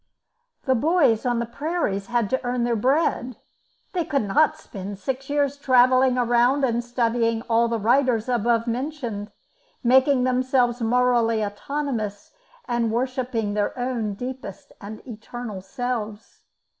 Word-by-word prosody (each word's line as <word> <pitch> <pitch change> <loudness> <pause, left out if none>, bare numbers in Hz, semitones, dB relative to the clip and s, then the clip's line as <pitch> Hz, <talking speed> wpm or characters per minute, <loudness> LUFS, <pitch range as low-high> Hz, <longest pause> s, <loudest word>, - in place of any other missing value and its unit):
The 260 - +2
boys 275 -3 +2
on 240 -1 +1
the 235 - -1
prairies 235 - -2
had 240 -3 0
to 260 - 0
earn 245 0 -1
their 235 0 +1
bread; 255 0 0 0.6
they 355 -2 0
could 280 -6 0
not 305 +10 +2
spend 200 -8 -8
six 265 +7 -4
years 285 -1 0
travelling 255 -1 +4
around 245 +3 +3
and 240 -2 +1
studying 230 -1 0
all 235 0 +2
the 230 0 -1
writers 235 +1 +2
above 235 -1 +1
mentioned, 240 -4 -4 0.5
making 260 +2 +4
themselves 255 -1 +1
morally 230 -2 +2
autonomous, 215 -2 -4 0.4
and 235 -2 0
worshipping 245 -3 -1
their 210 +4 -1
own 240 -5 -2
deepest 250 -4 -8
and 215 +5 -9
eternal 225 -2 -7
selves. 220 +1 -5
240 Hz, 130 wpm, -24 LUFS, 225-260 Hz, 0.6 s, travelling